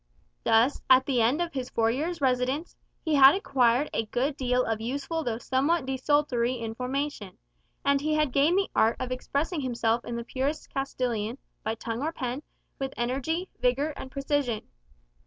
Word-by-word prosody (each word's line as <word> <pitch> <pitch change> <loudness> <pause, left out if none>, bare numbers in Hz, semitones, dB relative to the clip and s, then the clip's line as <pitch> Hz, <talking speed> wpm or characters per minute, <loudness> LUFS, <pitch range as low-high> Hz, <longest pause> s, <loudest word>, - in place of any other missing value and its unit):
Thus, 230 +5 +3
at 260 0 +7
the 255 -4 +1
end 260 +10 +3
of 340 - -6
his 260 -2 -3
four 225 0 +2
years' 320 +6 -2
residence, 260 +4 0 0.3
he 315 - +1
had 275 +2 +8
acquired 265 -6 +2
a 225 - -1
good 265 +6 -1
deal 250 -2 +1
of 220 -1 -2
useful 280 +7 -2
though 235 -4 -2
somewhat 270 +6 +1
desultory 265 -2 +1
information; 250 -1 -4 0.5
and 280 0 +3
he 305 +1 +1
had 305 -3 +2
gained 295 +7 +3
the 395 - 0
art 225 +1 +4
of 255 -1 -3
expressing 285 +5 -2
himself 235 -2 0
in 235 - -5
the 235 - -3
purest 270 +5 -3
Castilian, 245 -4 -2 0.3
by 220 +1 -1
tongue 230 +2 -4
or 310 +3 -1
pen, 260 -3 -4 0.4
with 270 0 -4
energy, 275 +9 -1
vigour, 265 +5 +1
and 260 - -8
precision. 275 -4 -1
260 Hz, 170 wpm, -27 LUFS, 240-290 Hz, 0.5 s, had